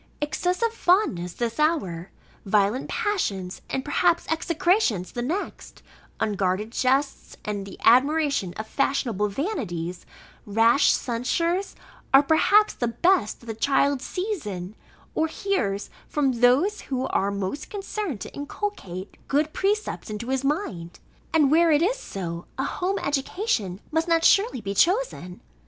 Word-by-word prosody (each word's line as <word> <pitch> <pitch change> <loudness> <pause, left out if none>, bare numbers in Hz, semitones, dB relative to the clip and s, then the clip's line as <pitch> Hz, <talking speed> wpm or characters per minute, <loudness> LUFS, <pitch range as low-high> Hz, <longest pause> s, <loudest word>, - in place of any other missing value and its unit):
Excessive 360 +9 0
fondness 350 - +1
this 235 - -3
hour; 195 - 0 0.3
violent 205 +4 +1
passions 290 - -2
and 265 - -2
perhaps 340 +4 +2
execrations, 325 - +1
the 240 - -4
next; 335 +12 -5 0.4
unguarded 200 +1 0
jests, 270 +3 0
and 200 -2 -4
admiration 280 - +3
of 215 - -5
fashionable 235 -5 0
vanities, 195 - -4 0.4
rash 225 +6 +4
censures, 335 +11 -1 0.4
are 275 - +8
perhaps 405 +8 +4
the 240 - -2
best, 235 - +1
that - - -15
the 225 - -4
child 275 +3 +2
sees 370 - -3
in, 185 0 -5 0.4
or 320 - +1
hears 240 - -2 0.2
from 285 -3 +1
those, 255 - +3
who 260 -1 -1
are 195 - +1
most 200 +9 -4
concerned 400 - -4
to - - -7
inculcate 285 - -5
good 300 +2 +1
precepts 410 - -1
into 215 +3 -5
his 265 0 0
mind. 240 - -2 0.3
And 300 -4 +4
where 330 +1 +5
it 300 +1 +4
is - - +1
so, 175 - -6
a 265 - -1
home 370 +7 -1
education 275 - -1
must 320 +2 0
not 330 -1 +3
surely 400 - +4
be 200 -1 -3
chosen. 350 - +1
275 Hz, 135 wpm, -25 LUFS, 205-345 Hz, 0.4 s, are